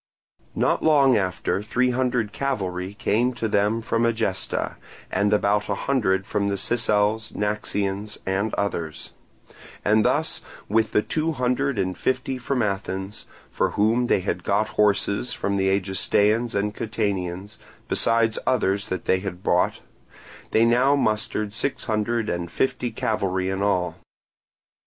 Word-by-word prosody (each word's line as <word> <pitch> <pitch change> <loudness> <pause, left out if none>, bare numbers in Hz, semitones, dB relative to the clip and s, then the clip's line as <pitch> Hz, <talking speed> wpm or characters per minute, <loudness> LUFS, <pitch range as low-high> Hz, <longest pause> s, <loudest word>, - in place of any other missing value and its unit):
Not - - +1
long 140 -5 +5
afterwards 95 +1 -1
three 125 +2 +2
hundred 125 -4 0
cavalry 95 -8 -2
came 120 +4 +1
to 115 -2 -2
them 105 +2 +1
from 115 +1 0
Egesta, 110 -5 -1 0.3
and 100 0 +1
about 105 0 +2
a 100 - +1
hundred 95 -7 0
from 100 -1 -1
the 100 0 -1
Sicels, 110 0 +1
Naxians, 105 0 -2
and 95 +3 0
others; 85 -6 -3 0.7
and 110 +1 +4
thus, - - +1 0.3
with 110 +1 +1
the 105 - +3
two 160 +1 -1
hundred 125 0 0
and 95 -1 -1
fifty 130 0 -1
from 125 0 0
Athens, 95 0 -4 0.2
for - - +1
whom 115 +4 +3
they 95 - +2
had 95 - -3
got 105 +2 +1
horses 105 +2 +1
from 100 0 -2
the 95 -1 +2
Egestaeans 100 +4 +1
and 105 +1 0
Catanians, 100 -3 -3 0.3
besides 115 -1 +2
others 100 -6 +1
that 95 - -4
they 95 - +2
bought, 90 -2 0 0.7
they 115 - +4
now 125 +4 +4
mustered 110 -4 -1
six 135 +4 -2
hundred 110 +1 -1
and 85 -2 -2
fifty 125 +4 0
cavalry 95 -4 -1
in 95 +1 -2
all. 90 -3 0
105 Hz, 140 wpm, -24 LUFS, 100-115 Hz, 0.7 s, long